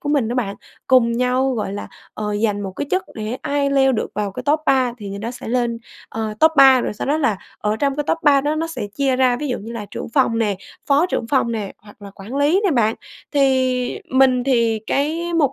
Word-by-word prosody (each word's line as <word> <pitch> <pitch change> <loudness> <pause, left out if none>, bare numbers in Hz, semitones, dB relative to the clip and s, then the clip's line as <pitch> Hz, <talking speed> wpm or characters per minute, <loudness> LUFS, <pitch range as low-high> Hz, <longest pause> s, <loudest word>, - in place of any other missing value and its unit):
của 290 - -5
mình 280 -6 +1
đó 240 - -2
bạn, 205 -6 -2 0.3
cùng 250 -3 +4
nhau, 250 +2 +1
gọi 210 -4 -3
là, 205 - -6 0.3
ờ, 210 -1 -3
giành 205 -2 0
một 195 -1 -5
cái 290 - -3
chức 375 +1 +1
để 215 +2 -4
ai 280 -1 0
leo 270 -1 +3
được 215 - -1
vào 205 -1 -2
cái 250 - -6
top 295 +3 +2
3 260 -3 +3
thì 205 - -7
người 200 - -6
đó 225 +3 -4
sẽ 245 -1 -8
lên, 240 -1 0 0.3
ờ, 220 -1 -4
top 315 - +6
3, 265 -2 +7
rồi - - -2
sau - - -5
đó 290 - +2
là 230 -9 +1 0.2
ở 210 0 -1
trong 275 +3 0
cái 295 - -1
top - - +1
3 285 -3 +5
đó 295 +2 -1
nó 325 - -1
sẽ 330 -10 -5
chia 270 -1 +1
ra 255 -1 +3
ví 290 +2 -4
dụ 250 - -2
như 225 +3 -8
là 220 -3 -6
trưởng - - -6
phòng 255 -5 +2
nè, 210 -4 0 0.3
phó 290 +5 +3
trưởng 235 - -2
phòng 250 -4 +1
nè 210 -4 -4
hoặc 205 0 -18
là 200 - -9
quản 210 +7 -8
lý 295 +7 +3
nè 390 - +3
bạn. 225 -5 +2 0.4
Thì 260 +2 +1
mình 260 -1 +3
thì 230 -4 +2
cái 325 +5 -1
mục 290 -5 +2
255 Hz, 250 wpm, -20 LUFS, 220-280 Hz, 0.4 s, 3